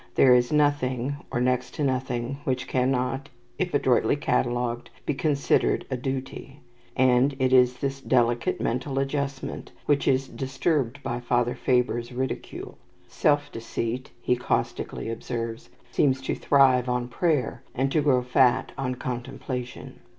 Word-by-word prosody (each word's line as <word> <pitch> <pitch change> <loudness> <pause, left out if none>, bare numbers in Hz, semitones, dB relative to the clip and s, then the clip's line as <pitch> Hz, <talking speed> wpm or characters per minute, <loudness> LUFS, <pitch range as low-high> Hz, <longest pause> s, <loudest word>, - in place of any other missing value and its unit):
There 130 -2 +6
is 125 0 +3
nothing, 145 -3 +1
or - - -1
next 125 0 0
to 150 - -2
nothing, 130 -1 -1
which 130 -1 -1
cannot, 130 +1 0 0.3
if 180 -1 0
adroitly 130 -1 +3
catalogued, 120 -3 -1 0.2
be - - 0
considered 140 0 +1
a - - +1
duty; 135 +2 -5 0.4
and 130 +2 +4
it 130 -1 +1
is 125 -1 +5
this 135 +1 -3
delicate 120 -2 +1
mental 130 +3 -2
adjustment 135 0 -3
which 145 -1 +2
is 135 0 +2
disturbed 135 0 -1
by 120 -2 -2
Father 120 0 +1
Faber's 125 -2 0
ridicule. 130 +1 -5 0.3
"Self 145 -1 +1
deceit," 115 +2 -4
he 125 - +2
caustically 125 - -2
observes, 115 0 -5 0.2
"seems 130 -1 +2
to - - -1
thrive 130 -3 +4
on 125 0 0
prayer, 150 +1 0
and 135 +2 0
to 155 - +3
grow 130 -4 +3
fat 125 0 +3
on 130 -2 -1
contemplation." 125 0 -6
130 Hz, 135 wpm, -26 LUFS, 125-135 Hz, 0.4 s, There